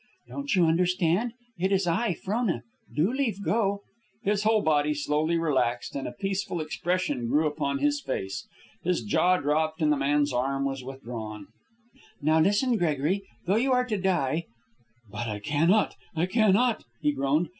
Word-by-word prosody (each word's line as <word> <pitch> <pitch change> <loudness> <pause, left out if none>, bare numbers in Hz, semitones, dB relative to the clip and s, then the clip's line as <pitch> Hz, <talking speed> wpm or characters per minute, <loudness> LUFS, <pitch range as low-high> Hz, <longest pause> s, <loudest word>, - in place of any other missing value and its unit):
"Don't 280 -5 -2
you 180 -2 +5
understand? 180 +6 +2 0.3
It 190 +2 +1
is 195 -1 +2
I, 180 +3 +1
Frona. 200 - -1 0.3
Do 160 - +1
leave 230 -8 -1
go." 200 -2 0 0.4
His 205 0 +1
whole 215 0 +3
body 150 -1 +2
slowly 150 +3 0
relaxed, 130 -7 0
and 140 - -3
a - - -4
peaceful 195 +5 -3
expression 155 -4 -1
grew 150 +6 +2
upon 140 -2 -1
his 145 +1 +1
face. 100 -9 -4 0.3
His 175 -7 0
jaw 180 - +3
dropped, 155 +2 0
and 155 -2 +3
the 150 - +3
man's 145 0 +1
arm 135 +2 0
was 135 -1 -3
withdrawn. 115 -6 -7 0.7
"Now 155 +2 +3
listen, 205 +8 +3
Gregory. 165 +2 0 0.2
Though 195 +4 +2
you 260 +3 +2
are 250 0 +3
to 220 -4 -1
die 170 -4 0 0.3
" 120 -2 -30
"But 120 - -4
I 105 -2 -3
cannot! 155 - +2 0.2
I 165 +2 +2
cannot!" 220 +4 +3 0.2
he 150 - +2
groaned. 145 +4 +1
160 Hz, 165 wpm, -27 LUFS, 140-195 Hz, 0.7 s, you